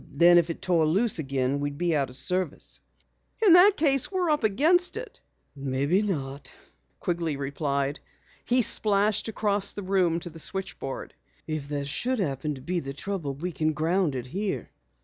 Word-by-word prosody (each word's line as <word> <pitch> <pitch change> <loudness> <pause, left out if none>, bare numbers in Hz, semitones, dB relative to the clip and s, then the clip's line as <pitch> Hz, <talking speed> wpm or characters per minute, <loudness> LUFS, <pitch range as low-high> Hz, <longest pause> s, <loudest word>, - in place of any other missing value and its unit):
Then 175 +4 +6
if 170 - -1
it 165 - -6
tore 170 -4 +2
loose 195 +4 +3
again 135 -1 -1
we'd 145 0 -3
be 175 -1 0
out 140 -3 0
of 125 - -9
service." 180 +1 -2 0.6
"In 370 - +8
that 375 +3 +7
case 275 -2 +3
we're 365 -4 0
up 300 -5 0
against 325 - +3
it." - - -8 0.4
"Maybe 140 +6 0
not," 140 -9 -4 0.5
Quigley 165 -4 -2
replied. 140 0 -2 0.4
He 250 0 +3
splashed 210 0 +2
across 205 -2 -1
the 205 - -6
room 185 -3 +1
to 175 - -8
the 165 - -11
switchboard. 180 -6 -5 0.3
"If 155 -3 -4
that 145 -1 -3
should 250 - -1
happen 150 - -2
to 130 - -11
be 175 +5 -2
the 135 -4 -6
trouble, 155 -3 -4
we 175 +6 -4
can 155 -1 -1
ground 160 0 0
it 125 -2 -4
here." 195 +9 -4
170 Hz, 170 wpm, -26 LUFS, 140-205 Hz, 0.6 s, In